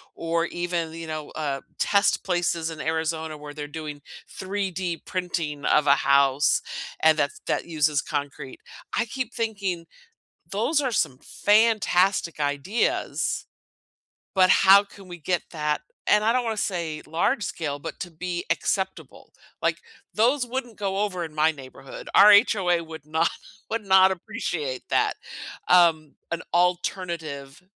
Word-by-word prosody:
or 165 0 0
even, 175 -2 -3
you 165 0 -7
know, 155 -1 -5
uh, 140 -3 -3 0.2
test 200 0 +2
places 175 -3 0
in 155 -1 -7
Arizona 160 -1 -2
where 150 0 -9
they're 150 -1 -5
doing 150 -1 -7 0.3
3D 185 -3 -3
printing 165 -6 -3
of 150 -1 +3
a 140 - +7
house 140 0 +3 0.4
and 160 0 +5
that 145 -1 +1 0.2
that - - 0
uses 150 -3 +1
concrete. 140 -3 -5 0.4
I 235 - +2
keep 250 0 -5
thinking, 200 -7 -2 0.7
those 235 +10 +1
are 260 -4 -1
some 130 - 0
fantastic 200 -5 +2
ideas, 145 - -1 0.9
but 185 -1 +5
how 195 +2 +7
can 200 -1 -15
we 175 - -7
get 175 +2 -1
that, 150 -2 -1 0.3
and 210 0 +4
I 225 - +3
don't 250 0 +1
wanna 225 -1 -1
say 170 -7 -2
large 205 - 0
scale, 150 -7 -3
but - - -7
to 175 - -5
be 175 +1 -4
acceptable. 190 +3 -2 0.3
Like, - - 0 0.3
those 250 +4 +2
wouldn't 245 -2 -5
go 195 -1 -2
over 185 -4 -2
in 160 - -10
my 155 +1 +4
neighborhood. 135 -2 -11
Our 210 +1 +9
HOA 190 -5 +4
would 160 -2 -10
not 160 +2 +1 0.4
would 230 -1 -2
not 190 -1 +6
appreciate 150 -6 -4
that, - - +2 0.5
um, 165 -4 +4 0.2
an 170 - -2
alternative 170 -5 -1
170 Hz, 145 wpm, -25 LUFS, 155-195 Hz, 0.9 s, Our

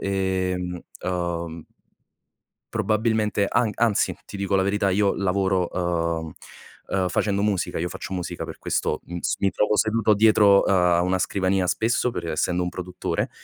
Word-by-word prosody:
ehm, 95 -2 -1 0.3
uhm 85 -2 -3 1.1
probabilmente 110 -1 +1
an 120 -1 +2
anzi, 115 -3 +2
ti 100 - -8
dico 100 0 -1
la 95 - +4
verità, 100 0 +1
io 100 +1 +2
lavoro, 95 -1 +1
uhm, 85 -2 -1 0.7
uh, - - 0
facendo 100 +2 0
musica, 100 -6 0
io 85 - -1
faccio 95 - -7
musica 90 -2 -4
per - - -8
questo, - - -1
mhmm, 85 0 -6
s - - -1
mi 100 - +2
trovo 105 +2 +1
seduto 110 0 +2
dietro 105 -1 +5
a 90 -2 +3
una 90 +1 +1
scrivania 95 0 0
spesso 115 +6 +1
per 85 -5 -5
essendo 90 +3 0
un 90 - -1
produttore, 90 0 -3
95 Hz, 150 wpm, -24 LUFS, 90-105 Hz, 1.1 s, dietro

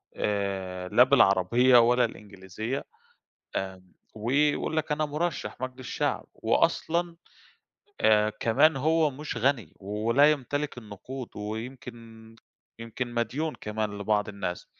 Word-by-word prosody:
آآ 95 -3 -2
لا 125 - +6
بالعربية 125 0 +5
ولا 120 +1 +4
الإنجليزية، 105 +4 -6 0.7
آمم 95 -1 -5 0.2
ويقول 145 +8 +1
لك 155 -1 0
أنا 155 +1 0
مُرشَّح 150 -7 -3
مجلس 130 -1 -6
شعب، - - -1
وأصلًا 170 +1 0 0.8
آآ 105 0 +4
كمان 125 +8 +3
هو 155 +2 +2
مش 145 -1 -6
غني 130 -1 0
ولا 115 +9 +3
يمتلِك 145 0 -3
النقود 120 +4 -8
ويمكن 115 0 -8 0.4
يمكن 120 +2 -5
مديون 140 +7 -1
كمان 105 -1 -3
لبعض 105 +1 0
الناس. 100 -3 -5
115 Hz, 110 wpm, -27 LUFS, 105-140 Hz, 0.8 s, لا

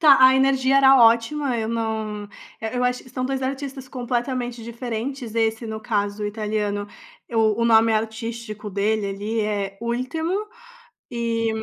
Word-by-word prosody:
tá, 295 -4 +8
a 260 0 +8
energia 265 0 +3
era 270 0 +7
ótima, 235 +4 +3
eu 220 -1 -2
não 220 -2 -2 0.4
eh, 220 +2 -3
eu 245 - 0
acho 250 0 0
que - - -14
são 255 - -3
2 265 0 -1
artistas 270 0 -4
completamente 245 -1 -3
diferentes, 235 +1 -5
esse 225 +1 +1
no 220 -1 -5
caso 210 -1 -1
italiano, 210 -1 -2 0.4
eu 220 -2 +2
o 230 - +1
nome 225 -1 +5
artístico 220 -1 -3
dele 205 +1 0
ali 205 +3 -2
é 200 -2 -2
Ultimo 320 - -2 0.6
e, 230 -2 -1
hum, 220 - -4
230 Hz, 155 wpm, -23 LUFS, 220-255 Hz, 0.6 s, tá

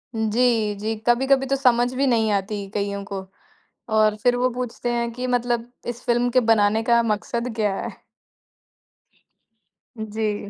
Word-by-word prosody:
जी, 220 -1 +1
जी। 215 +2 -3
कभी-कभी 265 +3 +3
तो 275 - +1
समझ 250 -2 +2
भी 275 +2 +1
नहीं 225 -3 +2
आती, 200 0 -2
कइयों 200 0 -3
को 195 0 -5 0.7
और 215 -1 +4
फिर 245 0 +3
वो 250 +1 +2
पूछते 245 0 -4
हैं 235 0 -1
कि 250 +2 -4
मतलब 240 -1 -1 0.2
इस 240 0 -5
फ़िल्म 245 0 +1
के 255 +1 +4
बनाने 215 +1 +2
का 235 0 +3
मकसद 230 +2 -2
क्या 210 -3 +1
है? - - -8 2.0
जी। 210 -1 -3
235 Hz, 150 wpm, -23 LUFS, 210-245 Hz, 2.0 s, और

